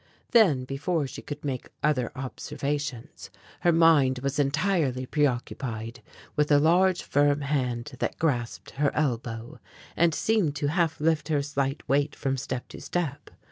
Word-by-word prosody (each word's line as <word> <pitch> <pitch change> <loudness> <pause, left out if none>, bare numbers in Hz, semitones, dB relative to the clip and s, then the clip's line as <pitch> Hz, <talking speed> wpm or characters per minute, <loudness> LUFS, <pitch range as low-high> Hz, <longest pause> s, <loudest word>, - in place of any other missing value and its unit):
Then, 175 - +5
before 150 +4 -1
she 130 - -7
could 145 0 -7
make 130 -3 -3
other 140 -5 +1
observations, 140 0 -4 0.3
her 175 - +3
mind 160 -6 +5
was 140 +1 -1
entirely 145 -3 +1
preoccupied 125 -4 -2 0.3
with 150 0 +1
a 145 - +7
large, 175 +4 +3
firm 145 0 +2
hand 130 -3 -1
that - - -2
grasped 125 -8 -1
her 145 +1 +1
elbow, 120 -5 -2 0.4
and 165 -2 +3
seemed 205 -10 +1
to 145 0 -1
half 165 -2 +1
lift 160 0 +1
her 150 -3 +1
slight 140 0 -2
weight 140 +2 +1
from 135 -1 -1
step 130 -1 -4
to - - -10
step. 160 -6 -3
145 Hz, 145 wpm, -27 LUFS, 130-160 Hz, 0.4 s, a